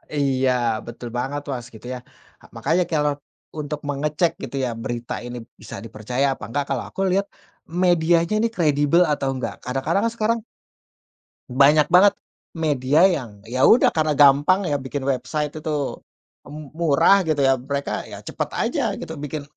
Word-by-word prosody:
iya, 135 -2 +1 0.3
betul 120 0 -8
banget, 140 +3 -2
Mas, 120 -3 -5
gitu, 110 - -13
ya. 125 - -5 0.4
Ah, - - -18
makanya 175 +3 +1
kalau 150 -2 +2 0.5
untuk 150 0 -4
mengecek, 150 +4 0
gitu, - - -6
ya, - - -1
berita 120 0 -4
ini 120 0 -6 0.2
bisa - - -9
dipercaya 115 +5 -2
apa - - -12
enggak, 140 +5 -1
kalau 130 -3 -1
aku 195 - -5
lihat 195 +1 +1 0.6
medianya 170 +1 +3
ini 230 +1 +1
kredibel 150 0 +3
atau 140 -2 -1
enggak. 130 - -4
Kadang-kadang 135 +9 0
kan 230 - 0
sekarang 230 +1 +1 1.1
banyak 140 +4 +5
banget 200 +3 +6 0.4
media 150 +1 +2
yang, 120 - -1
ya, 130 +3 +2
udah 235 - +5
karena 155 -2 0
gampang, 145 +7 +5
ya, 145 -5 -1
bikin 130 +1 -5
website 140 +3 -2
itu 150 -3 -3 0.5
m 150 -1 -10
murah, 165 +4 +4
gitu, 155 -3 0
ya, 135 -1 +3
mereka, 140 +2 -3
ya, - - -10
cepet - - -4
aja 290 -7 0
gitu 160 - -7
bikin 150 0 -5
145 Hz, 160 wpm, -22 LUFS, 130-165 Hz, 1.1 s, banget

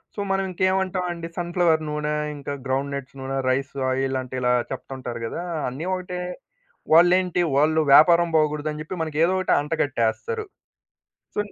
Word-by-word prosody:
So - - -7
మనం 195 0 +1
ఇంకేమంటామండీ 185 -2 -1
sun 175 -1 -3
flower 165 -3 +3
నూనె 150 0 -2 0.2
ఇంకా 140 0 -5
గ్రౌండ్ 135 +2 -1
నట్స్ 135 -1 -8
నూనె 135 +1 -3
రైస్ 135 +2 -1 0.2
ఆయిలంటే 130 -1 -2
ఇలా 125 0 +2 0.2
చెప్తుంటారు 130 -2 -6
గదా! 170 - -4 0.2
అన్నీ 135 +6 -5
ఒకటే 180 -1 -5 0.7
వాళ్లేంటి 180 +1 +5
వాళ్ళు 155 +3 +3
వ్యాపారం 170 +4 +7
పోగూడదని 150 0 0
జెప్పి 155 +4 -6
మనకి 155 -2 -3
ఏదో 175 +3 +3
ఒటి 185 - +2
అంటగట్టేస్తారు. 150 - -1 0.9
సో, - - -5
155 Hz, 140 wpm, -24 LUFS, 135-175 Hz, 0.9 s, వ్యాపారం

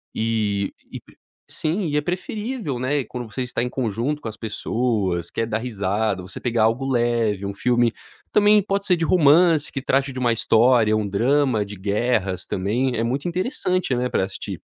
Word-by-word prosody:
E 105 -3 0 0.2
e - - -5 0.5
sim 170 +4 -1
e 150 -1 0
é - - +2
preferível, 195 - -4
né, 135 +3 0
quando 125 0 -7
você 130 - -3
tá - - 0
em 125 - -2
conjunto 125 +4 -2
com - - -6
as 110 - -10
pessoas, 105 -5 -1
quer 115 - -1
dar 110 - -1
risada, 105 -3 -1
você 95 +1 -7
pegar 115 -3 +1
algo 115 +4 +1
leve, 115 -5 +1
um 100 - -3
filme, 120 +2 +2 0.4
também 210 0 +5
pode 200 0 -1
ser 180 - +4
de 165 - -2
romance, 160 -1 +4
que 135 - -4
trate 135 0 0
de - - -9
uma 120 -2 +2
história, 115 -1 +4
um 105 -1 -1
drama 120 +2 +1
de 100 +1 -9
guerras 100 -2 -1
também, 120 +7 -1
é 115 - 0
muito 130 +7 -2
interessante, 185 - -1
né, 125 +1 0
pra - - +1
assistir. 95 0 -6
120 Hz, 185 wpm, -22 LUFS, 105-145 Hz, 0.5 s, também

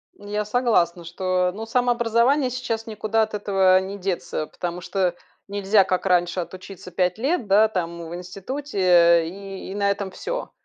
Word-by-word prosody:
Я 210 +1 -4
согласна, 210 -7 +1
что, 180 +1 0
ну 220 +3 -6
самообразование 245 +3 +2
сейчас 235 -3 -3
никуда 220 0 0
от 220 - -5
этого 195 -2 +3
не 190 +2 -5
деться. 180 -5 -3
Потому 175 +2 -5
что 185 -1 -1 0.3
нельзя, 200 0 +3
как 185 -1 -1
раньше, 175 -1 +2
отучиться 185 +1 -8
5 180 +1 0
лет, 265 0 -1
да, 205 +3 +5
там 170 -5 -4
в 170 - -6
институте 180 - +2
и 195 +2 -8
и - - -6
на 200 -1 +1
этом 200 -1 -4
всё. - - -5
195 Hz, 160 wpm, -23 LUFS, 180-220 Hz, 0.3 s, да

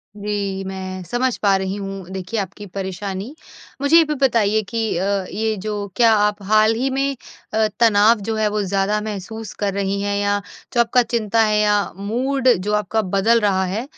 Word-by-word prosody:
जी। 200 -2 -3
मैं 185 -1 -6
समझ 245 +7 -1
पा 200 -2 +3
रही 190 0 -3
हूँ 195 -2 -6
देखिए 190 +4 -4
आपकी 200 +1 -6
परेशानी। 195 - -5 0.5
मुझे 285 +4 +5
ये 335 - +7
भी 300 -1 -2
बताइए 220 -4 +2
कि 225 -2 -1
अ, 195 +1 0
ये 220 +2 -1
जो 205 +1 -4
क्या 230 -2 +5
आप 210 0 +1
हाल 215 +2 +4
ही 260 +4 0
में 275 +1 -1 0.4
अ, 220 0 +3
तनाव 220 0 +5
जो 220 - 0
है 215 -1 +1
वो 210 0 -1
ज़्यादा 200 +2 0
महसूस 215 +1 -6
कर 200 -2 0
रही 200 0 -1
हैं 200 0 -1
या 205 0 0 0.3
जो 240 - +1
आपका 235 +2 +3
चिंता 230 -1 0
है 210 0 +2
या 210 -1 +2
मूड 250 +6 -1
जो 205 +4 -3
आपका 210 +1 +1
बदल 200 +4 +2
रहा 195 -2 +2
है 195 +5 -3
210 Hz, 190 wpm, -20 LUFS, 195-225 Hz, 0.5 s, ये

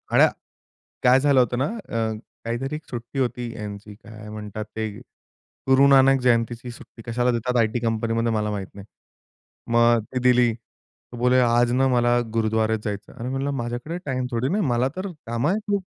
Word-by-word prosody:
आया - - +7 0.7
काय 125 +1 +5
झालं 140 -2 +4
होतं 120 0 +1
ना 135 - +1
अ, 115 - -3 0.3
काहीतरी 135 +6 -3
एक 155 - -10
सुट्टी 120 +2 -6
होती 120 -2 -2
यांची 105 -1 -8
काय 105 -1 -12
म्हणतात 105 0 -6
ते 110 -1 -1 0.8
गुरुनानक 135 0 +6
जयंतीची 120 0 +1
सुट्टी. 115 -1 -13
कशाला 125 +1 +1
देतात 120 +2 -1
आयटी 110 +1 +2
कंपनीमध्ये 115 0 0
मला 105 -1 0
माहीत 100 -2 -4
नाही. 100 0 -11 0.9
मग 120 -1 +4
ती - - +1
दिली. 125 -2 +4 0.6
तो - - -7
बोलले 125 +1 +3
आज 120 0 +3
न 130 +2 +2
मला 120 0 +3 0.2
गुरुद्वारेत 110 0 +1
जायचं. 105 -1 -5
"अरे," 120 +2 -6
म्हणलं, 135 +2 -2
"माझ्याकडे 120 +9 -4
टाईम 130 -2 -1
थोडी 120 +2 -1
ना 200 - 0
आहे. 190 - +1
मला 120 +2 +2
तर 190 +1 -4 0.2
कामं 120 +7 0
आहे 205 - +1
खूप." 200 -2 0
120 Hz, 175 wpm, -23 LUFS, 115-130 Hz, 0.9 s, आया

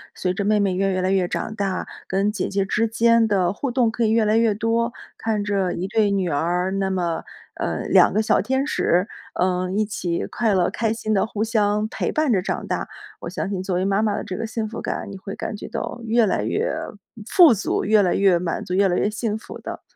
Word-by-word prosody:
随 180 -1 -1
着 200 - -2
妹 210 +1 +2
妹 200 -2 +1
越 195 +1 +1
越 185 0 0
来 185 - +1
越 190 -2 +2
长 215 - -3
大， 200 -3 -2 0.2
跟 195 +2 +1
姐 210 -3 -3
姐 195 0 0
之 225 +3 +1
间 230 0 +3
的 190 -4 +1
互 275 +6 -3
动 240 -2 +2
可 235 - -1
以 220 - +3
越 225 0 +3
来 210 +1 +2
越 225 -2 +3
多。 230 +2 0 0.3
看 215 -2 -1
着 200 -3 0
一 185 - -3
对 215 0 +2
女 195 -3 0
儿， 175 +5 0
那 195 0 -1
么 175 -3 -1 0.3
呃， - - -2
两 - - +5
个 215 - +2
小 215 - +2
天 265 +1 0
使， 180 - +1 0.3
嗯， 185 +1 0
一 215 - +2
起 180 -5 -2
快 225 -3 0
乐 185 -2 +2
开 220 +3 -1
心 220 -1 -2
地 195 - +2
互 215 -1 -3
相 210 -2 +1
陪 - - -2
伴 310 -2 +1
着 190 - +2
长 - - -3
大， - - -2 0.3
我 - - -5
相 - - -3
信 195 -2 -2
作 190 -1 -2
为 185 +1 0
妈 195 +1 +2
妈 215 -2 +1
的 - - -3
这 185 - -5
个 - - -3
幸 220 0 -3
福 230 - -6
感， - - -4
你 195 - -7
会 195 +1 -7
感 - - -4
觉 205 - -8
到 240 - -5
越 230 0 +3
来 200 - 0
越 465 +4 -1 0.6
富 345 -8 +7
足， 205 - -1
越 215 +1 +5
来 180 -3 +2
越 195 -3 +4
满 170 -1 -3
足， 180 - -4
越 195 +1 +4
来 180 - +1
越 - - +1
幸 215 0 -2
福 220 - -10
的。 - - -7
205 Hz, 260 characters per minute, -22 LUFS, 190-220 Hz, 0.6 s, 富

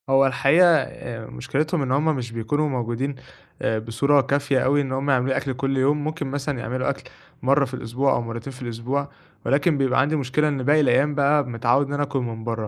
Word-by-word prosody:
هو 135 0 +5
الحقيقة، 140 +6 +4
آآ 120 -5 -4
مُشكِلتهُم 150 - -2
إن 130 -2 -2
هُم 150 +3 +2
مش 120 -3 -5
بيكونوا 130 +7 -1
موجودين 125 +2 -2 0.7
بصورة 140 +5 +3
كافية 140 0 0
أوي، 145 +3 +2
إن 135 -2 -4
هُم 135 +2 -2
يعملوا 130 -1 +2
لي - - +1
أكل 135 - -2
كل 135 +1 -2
يوم، 145 +3 +2
ممكن 155 -1 -3
مثلًا 140 -1 -3
يعملوا 130 +3 -2
أكل 140 - -4 0.4
مرة 140 +2 +3
في 130 - -11
الأسبوع، 130 +3 -1
أو - - 0
مرتين 115 +3 -6
في 130 - -13
الأسبوع، 125 +4 -3 0.4
ولكن 145 +5 +2
بيبقى 135 -2 +2
عندي 150 +3 +1
مشكلة 145 +1 0
إن 140 -3 -2
باقي 150 +3 +4
الأيام 140 +2 +2
بقى، 145 +1 +3
متعود 120 +3 +1
إن 145 - -5
أنا 145 0 0
آكل 140 -1 -2
من 115 -3 -5
برّه، 115 -2 -3
135 Hz, 210 wpm, -23 LUFS, 125-145 Hz, 0.7 s, هو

